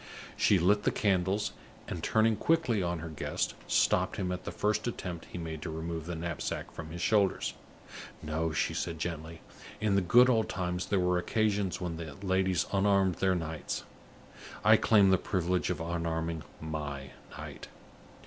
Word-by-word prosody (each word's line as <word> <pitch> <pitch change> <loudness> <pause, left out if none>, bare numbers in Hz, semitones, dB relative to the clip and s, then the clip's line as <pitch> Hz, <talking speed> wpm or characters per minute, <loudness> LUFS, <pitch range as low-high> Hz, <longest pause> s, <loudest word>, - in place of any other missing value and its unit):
She 100 - +4
lit 100 +4 +3
the - - +2
candles, 95 0 +1 0.4
and, 85 - -4
turning 110 0 +3
quickly 145 -7 +2
on 85 -1 -1
her 85 - -5
guest, 75 - -2
stopped - - +2
him 90 -2 -2
at 90 - -5
the - - -3
first 105 +3 0
attempt 90 -7 -5
he - - -6
made 80 -2 -5
to - - -4
remove 80 0 -4
the 85 - -3
knapsack 85 -1 -4
from 80 -1 -8
his 85 +1 -5
shoulders. 100 +1 +2 0.7
"No," 80 +1 -1
she 75 - 0
said, 85 - -3
gently; 80 -1 -5 0.4
"in 105 -1 +1
the 100 - +4
good 120 +8 +6
old 115 -4 +2
times 90 -1 -2
there 100 - +2
were 90 0 +2
occasions 105 -1 0
when 85 -3 -3
the 80 -4 -7
ladies 95 -2 +2
unarmed 100 -2 +3
their 95 -1 +2
knights. 80 -2 -4 0.8
I - - +8
claim 100 -4 +5
the 95 - +4
privilege 90 -1 0
of 90 - -1
unarming 80 -1 -2 0.2
my 75 -4 -5 0.3
knight." - - -8
90 Hz, 170 wpm, -31 LUFS, 80-100 Hz, 0.8 s, I